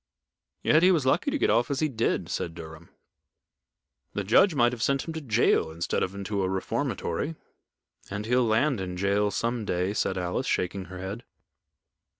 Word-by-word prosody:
"Yet 155 Hz, -, +5 dB
he 180 Hz, -, +6 dB
was 160 Hz, -7 st, +2 dB
lucky 165 Hz, -, +2 dB
to 300 Hz, -, 0 dB
get -, -, +2 dB
off 115 Hz, +2 st, +2 dB
as 140 Hz, -2 st, -1 dB
he 155 Hz, -, +2 dB
did," 115 Hz, -5 st, -1 dB
said 85 Hz, -1 st, -3 dB
Durham. 80 Hz, 0 st, -10 dB, 1.2 s
"The 100 Hz, -, -2 dB
judge 155 Hz, -, +4 dB
might 120 Hz, -3 st, +4 dB
have 120 Hz, -2 st, -6 dB
sent 140 Hz, +4 st, 0 dB
him 165 Hz, -, -4 dB
to 160 Hz, -, -5 dB
jail 115 Hz, -, +2 dB
instead 85 Hz, +2 st, -2 dB
of 95 Hz, -, -2 dB
into 100 Hz, 0 st, -2 dB
a 95 Hz, -, 0 dB
reformatory." 110 Hz, -, -2 dB, 0.7 s
"And 105 Hz, +1 st, -4 dB
he'll 125 Hz, +2 st, +3 dB
land 115 Hz, +1 st, +2 dB
in 90 Hz, -1 st, -5 dB
jail 100 Hz, +2 st, +1 dB
some 115 Hz, +2 st, -2 dB
day," 90 Hz, 0 st, -1 dB
said 95 Hz, -2 st, -1 dB
Alice, 90 Hz, +8 st, -2 dB
shaking 95 Hz, +1 st, -1 dB
her 95 Hz, 0 st, -9 dB
head. 100 Hz, +6 st, -6 dB
105 Hz, 180 wpm, -27 LUFS, 95-130 Hz, 1.2 s, he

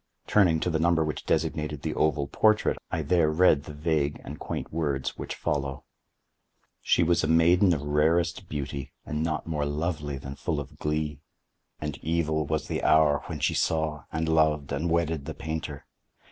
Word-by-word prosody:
Turning 90 Hz, -6 st, +4 dB
to 90 Hz, -, -1 dB
the 80 Hz, -, 0 dB
number 80 Hz, -1 st, +3 dB
which 75 Hz, -, -5 dB
designated 75 Hz, -2 st, -1 dB
the 80 Hz, -, -1 dB
oval 75 Hz, -2 st, +1 dB
portrait, 110 Hz, +9 st, +2 dB
I -, -, -2 dB
there 85 Hz, -4 st, +3 dB
read 75 Hz, -2 st, +4 dB
the 75 Hz, -, -8 dB
vague 75 Hz, -1 st, 0 dB
and -, -, -8 dB
quaint -, -, -5 dB
words 70 Hz, -5 st, -1 dB
which -, -, -5 dB
follow: 70 Hz, -1 st, -2 dB, 1.0 s
"She 85 Hz, -, +3 dB
was 85 Hz, +1 st, +2 dB
a -, -, +1 dB
maiden 85 Hz, +4 st, +5 dB
of 75 Hz, -4 st, 0 dB
rarest 80 Hz, +5 st, +1 dB
beauty, 70 Hz, -2 st, -5 dB
and 75 Hz, +1 st, -3 dB
not 80 Hz, -1 st, -1 dB
more 75 Hz, -3 st, -1 dB
lovely 75 Hz, -1 st, -2 dB
than 70 Hz, 0 st, -7 dB
full 75 Hz, +2 st, -2 dB
of 70 Hz, -, -9 dB
glee. 75 Hz, -1 st, -2 dB, 0.6 s
And 75 Hz, -2 st, -4 dB
evil 80 Hz, -2 st, 0 dB
was 80 Hz, -1 st, -1 dB
the -, -, -2 dB
hour 75 Hz, -2 st, +4 dB
when -, -, -5 dB
she -, -, +1 dB
saw, 80 Hz, -2 st, 0 dB
and 80 Hz, +1 st, -1 dB
loved, 80 Hz, -3 st, +2 dB
and 85 Hz, +2 st, -1 dB
wedded 80 Hz, -3 st, 0 dB
the -, -, -6 dB
painter. 80 Hz, -2 st, -5 dB
80 Hz, 175 wpm, -27 LUFS, 75-80 Hz, 1.0 s, maiden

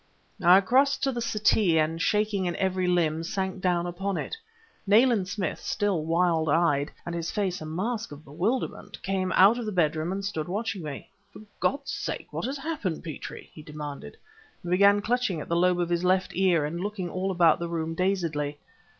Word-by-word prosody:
I 180 Hz, +3 st, +7 dB
crossed 265 Hz, +7 st, +2 dB
to 270 Hz, -, +2 dB
the 240 Hz, -2 st, -4 dB
settee, 210 Hz, -6 st, +2 dB
and 160 Hz, +1 st, +1 dB
shaking 210 Hz, -2 st, +1 dB
in 175 Hz, -, -1 dB
every 185 Hz, -1 st, 0 dB
limb, 165 Hz, -3 st, +1 dB
sank 190 Hz, +2 st, -3 dB
down 175 Hz, -2 st, +1 dB
upon 185 Hz, +2 st, -3 dB
it. -, -, -4 dB, 0.5 s
Nayland 220 Hz, -2 st, +4 dB
Smith, 185 Hz, -3 st, -3 dB
still 200 Hz, -6 st, -1 dB
wild 165 Hz, -1 st, +1 dB
eyed, 145 Hz, -2 st, +2 dB, 0.2 s
and 170 Hz, -, -4 dB
his 170 Hz, -1 st, -3 dB
face 195 Hz, -4 st, -2 dB
a 155 Hz, -, -6 dB
mask 210 Hz, +7 st, -3 dB
of 145 Hz, +1 st, -11 dB
bewilderment, 185 Hz, -, -3 dB
came 190 Hz, -1 st, -1 dB
out 205 Hz, +6 st, +6 dB
of 235 Hz, -, -4 dB
the -, -, -2 dB
bedroom 160 Hz, -2 st, 0 dB
and 195 Hz, +1 st, -3 dB
stood 160 Hz, -6 st, -3 dB
watching 205 Hz, +1 st, -3 dB
me. 150 Hz, -4 st, -7 dB, 0.3 s
"For -, -, -11 dB, 0.2 s
God's 280 Hz, 0 st, -1 dB
sake -, -, -5 dB
what -, -, -3 dB
has 270 Hz, +3 st, -3 dB
happened, 270 Hz, -, -3 dB
Petrie?" 160 Hz, -3 st, -8 dB
he 155 Hz, -, -11 dB
demanded, 150 Hz, -, -8 dB, 0.5 s
and 175 Hz, -, -5 dB
began 200 Hz, +2 st, +5 dB
clutching 240 Hz, -7 st, 0 dB
at -, -, -7 dB
the 170 Hz, -, +1 dB
lobe 180 Hz, +1 st, +3 dB
of 175 Hz, -1 st, 0 dB
his 175 Hz, 0 st, 0 dB
left 185 Hz, +1 st, +2 dB
ear 180 Hz, -5 st, +3 dB
and 170 Hz, +4 st, -4 dB
looking 200 Hz, -2 st, -3 dB
all 185 Hz, +2 st, -2 dB
about 175 Hz, -4 st, +4 dB
the 170 Hz, 0 st, -3 dB
room 165 Hz, -1 st, -2 dB
dazedly. 165 Hz, -6 st, -1 dB
180 Hz, 195 wpm, -27 LUFS, 165-200 Hz, 0.5 s, I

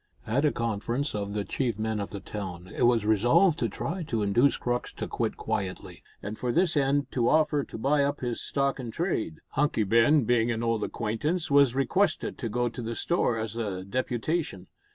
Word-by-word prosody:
At 135 Hz, +7 st, +1 dB
a 150 Hz, -, +4 dB
conference 115 Hz, +5 st, -2 dB
of 100 Hz, -1 st, -3 dB
the 105 Hz, -1 st, -2 dB
chief 120 Hz, -6 st, -1 dB
men 110 Hz, 0 st, -1 dB
of 100 Hz, -, -3 dB
the 100 Hz, -, -6 dB
town 95 Hz, -2 st, -7 dB
it -, -, +4 dB
was 115 Hz, -3 st, +2 dB
resolved 120 Hz, -, +4 dB
to 115 Hz, -, 0 dB
try 175 Hz, -, -4 dB
to 115 Hz, -9 st, -1 dB
induce 120 Hz, +8 st, +3 dB
Crux 120 Hz, 0 st, -2 dB
to -, -, -5 dB
quit -, -, -2 dB
quietly, 95 Hz, -2 st, -4 dB, 0.2 s
and 105 Hz, +2 st, -5 dB
for 125 Hz, -, -1 dB
this 175 Hz, +3 st, +2 dB
end 140 Hz, -1 st, +1 dB
to 120 Hz, -2 st, +1 dB
offer 150 Hz, -2 st, +3 dB
to -, -, -8 dB
buy 140 Hz, +5 st, +2 dB
up 140 Hz, +1 st, -1 dB
his 120 Hz, -2 st, -2 dB
stock 140 Hz, -1 st, 0 dB
in 125 Hz, -3 st, -5 dB
trade. 115 Hz, -, -2 dB
Hunky 140 Hz, -6 st, +1 dB
Ben, 115 Hz, +8 st, +4 dB
being 120 Hz, 0 st, +2 dB
an 115 Hz, -1 st, -1 dB
old 115 Hz, -2 st, 0 dB
acquaintance, 145 Hz, +10 st, -2 dB
was 140 Hz, -3 st, +5 dB
requested 155 Hz, +7 st, +1 dB
to 115 Hz, -, -3 dB
go 120 Hz, +3 st, 0 dB
to 120 Hz, +1 st, -5 dB
the 115 Hz, 0 st, -4 dB
store 145 Hz, -8 st, +1 dB
as 110 Hz, 0 st, -4 dB
a 100 Hz, -5 st, -3 dB
deputation. 125 Hz, -, -2 dB
120 Hz, 200 wpm, -28 LUFS, 110-140 Hz, 0.2 s, was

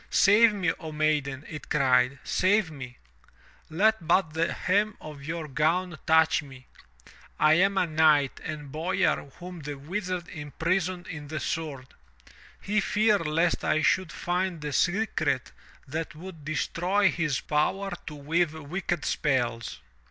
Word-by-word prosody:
'Save 215 Hz, +3 st, +6 dB
me, 185 Hz, -5 st, 0 dB
O 160 Hz, -1 st, -7 dB
maiden!' 150 Hz, -2 st, 0 dB
it 155 Hz, -, -9 dB
cried, 130 Hz, -2 st, +3 dB
'save 190 Hz, -2 st, +2 dB
me! 130 Hz, -5 st, -9 dB, 0.7 s
Let 195 Hz, +1 st, +2 dB
but 170 Hz, -2 st, +3 dB
the 165 Hz, +1 st, 0 dB
hem 205 Hz, +4 st, 0 dB
of 150 Hz, -2 st, -10 dB
your 160 Hz, +1 st, -4 dB
gown 160 Hz, +4 st, 0 dB
touch 160 Hz, 0 st, +4 dB
me. 135 Hz, -3 st, -13 dB, 0.7 s
I 155 Hz, 0 st, +5 dB
am 195 Hz, 0 st, +2 dB
a 185 Hz, -, +3 dB
knight 155 Hz, -4 st, +3 dB
and 150 Hz, -3 st, -6 dB
boyar 165 Hz, -1 st, 0 dB
whom 180 Hz, 0 st, -8 dB
the 145 Hz, -1 st, -6 dB
Wizard 180 Hz, +4 st, -4 dB
impris 165 Hz, +4 st, -1 dB
oned 180 Hz, -2 st, -7 dB
in 150 Hz, -3 st, -7 dB
the 155 Hz, +1 st, -4 dB
sword! 140 Hz, -1 st, -4 dB, 0.7 s
He 210 Hz, +1 st, 0 dB
feared 210 Hz, -3 st, +2 dB
lest 165 Hz, +3 st, +1 dB
I 155 Hz, -, +1 dB
should 185 Hz, -2 st, +2 dB
find 180 Hz, -1 st, -2 dB
the 150 Hz, -1 st, -4 dB
secret 175 Hz, -, 0 dB, 0.4 s
that 155 Hz, +1 st, -4 dB
would 165 Hz, -1 st, -10 dB
destroy 180 Hz, +5 st, +1 dB
his 150 Hz, -4 st, -1 dB
power 190 Hz, +6 st, 0 dB, 0.2 s
to 150 Hz, -, -6 dB
weave 155 Hz, +3 st, 0 dB
wicked 160 Hz, 0 st, -3 dB
spells. 120 Hz, -, -1 dB
160 Hz, 145 wpm, -27 LUFS, 150-185 Hz, 0.7 s, Save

